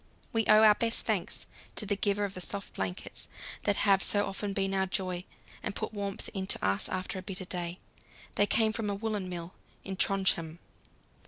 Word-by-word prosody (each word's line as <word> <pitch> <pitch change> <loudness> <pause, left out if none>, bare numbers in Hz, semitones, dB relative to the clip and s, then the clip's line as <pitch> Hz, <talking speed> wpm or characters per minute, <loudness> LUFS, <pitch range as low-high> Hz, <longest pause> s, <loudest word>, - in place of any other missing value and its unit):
We 225 -1 +2
owe 215 +1 +8
our 215 -1 +9
best 230 +2 0
thanks - - -1 0.3
to 215 - 0
the 205 0 +1
giver 200 +1 +1
of 200 -1 -2
the 185 - -6
soft 200 +2 -4
blankets 95 -1 -3 0.4
that 205 - +4
have 195 -2 +6
so 205 +1 +2
often 200 +1 -3
been 195 0 0
our 190 0 +2
joy 185 -1 -1 0.4
and 205 - -3
put - - -3
warmth 200 -1 -3
into 190 -1 +1
us 95 +1 +1
after 185 +1 -2
a - - -5
bitter 185 0 -5
day; 175 -1 -3 0.6
they 205 - +4
came 220 0 +3
from 220 -3 -1
a 200 - 0
woollen 205 -3 -2
mill 175 0 -5 0.3
at 190 -1 -4
Trondhjem. 175 -4 +2
195 Hz, 190 wpm, -31 LUFS, 185-205 Hz, 0.6 s, our